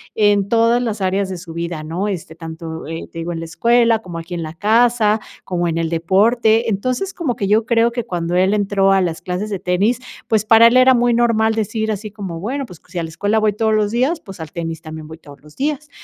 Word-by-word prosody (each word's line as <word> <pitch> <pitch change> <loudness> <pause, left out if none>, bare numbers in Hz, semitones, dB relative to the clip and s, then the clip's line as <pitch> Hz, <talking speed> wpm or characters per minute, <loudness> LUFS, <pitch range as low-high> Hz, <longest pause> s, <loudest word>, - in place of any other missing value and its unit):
en 205 -2 +3
todas 230 +2 +3
las 220 -4 -3
áreas 190 +1 0
de 185 - -4
su 170 -1 -10
vida, 170 -1 -4
¿no? 170 +6 -3
Este, 175 -5 -5
tanto, 160 -1 -7
eh, 165 0 -6
te 165 - -7
digo 170 +1 -3
en 165 - -5
la 165 - -5
escuela, 230 +6 +3
como 175 -5 -7
aquí 165 +2 -8
en 170 - -3
la 155 0 -6
casa, 220 +3 +3 0.2
como 175 -1 -1
en 165 -1 -1
el 165 -1 -1
deporte. 220 +7 +2
Entonces 255 - -2
como 290 -9 -2
que 200 - -2
yo 215 +1 +3
creo 235 -1 +2
que 240 -1 -4
cuando 175 -1 -2
él 190 +2 +3
entró 200 -1 +2
a 195 - +3
las 170 -3 -2
clases 185 +4 -3
de 200 - -3
tenis, 200 +8 +1 0.3
pues 215 -2 +1
para 225 +1 +7
él 240 +2 +4
era 255 +1 +6
muy 240 -1 +2
normal 230 -2 +2
decir 220 0 -1
así 210 0 -5
como: 190 -6 -6
"Bueno, 265 +9 -3
pues 180 -8 -14
si 175 - -5
a - - -2
la 165 - -5
escuela 205 +7 0
voy 215 -1 +2
todos 220 +1 +1
los 210 -1 +1
días, 260 +8 +1
pues 195 - -12
al 160 -1 -7
tenis 165 -1 -5
también 155 -2 -9
voy 160 +1 -10
todos 145 -4 -15
los 150 +1 -18
días". 295 +1 -2
205 Hz, 245 wpm, -19 LUFS, 170-230 Hz, 0.3 s, para